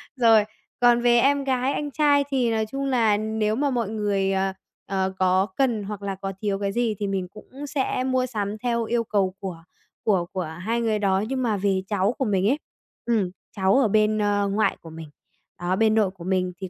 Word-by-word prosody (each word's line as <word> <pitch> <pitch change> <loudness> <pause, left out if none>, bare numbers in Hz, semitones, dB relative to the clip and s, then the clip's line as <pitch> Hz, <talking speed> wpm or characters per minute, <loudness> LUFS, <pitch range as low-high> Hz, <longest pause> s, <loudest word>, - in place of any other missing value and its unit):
Rồi! 225 -4 +5 0.4
Còn 240 0 +5
về 240 0 +4
em 280 +2 +3
gái, 260 0 0
anh 295 -1 -3
trai 290 -1 +3
thì 250 -4 +1
nói 220 -1 0
chung 275 +5 -4
là 230 -6 +3
nếu 215 0 -1
mà 285 +2 +1
mọi 235 -5 -1
người, 200 -3 0
ờ, 190 0 0 0.3
ờ, 190 -1 -1
có 185 +1 +3
cần 240 -6 +1
hoặc 205 0 -6
là 195 -1 -3
có 195 0 -5
thiếu 200 -2 -1
cái 200 -1 -1
gì 230 -1 0
thì 205 - -1
mình 190 -2 -2
cũng 260 +9 -10
sẽ 265 -2 -1
mua 255 -1 +1
sắm 210 -4 -3
theo 235 0 -1
yêu 235 +1 0
cầu 195 -3 0
của 180 -5 -6 0.4
của 190 -5 +2
của 185 -1 -2 0.2
hai 230 +5 -1
người 220 -2 0
đó. 195 0 +1
Nhưng 260 0 -2
mà 215 -4 +1
về 190 -1 +1
cháu 205 +2 +1
của 265 - 0
mình 195 -2 +1
ấy, 290 +4 +1 0.5
ừm, 215 -7 +1 0.2
cháu 190 0 +2
ở 245 - +3
bên, 215 +1 +2
ơ, 205 -1 +1
ngoại 210 +2 +1
của 165 - -11
mình, 160 -1 -9 0.5
đó, 175 +1 0
bên 220 +2 +3
nội 205 -4 +2
của 180 -3 -13
mình 185 -1 0
thì 190 - -5
210 Hz, 220 wpm, -24 LUFS, 195-240 Hz, 0.5 s, Rồi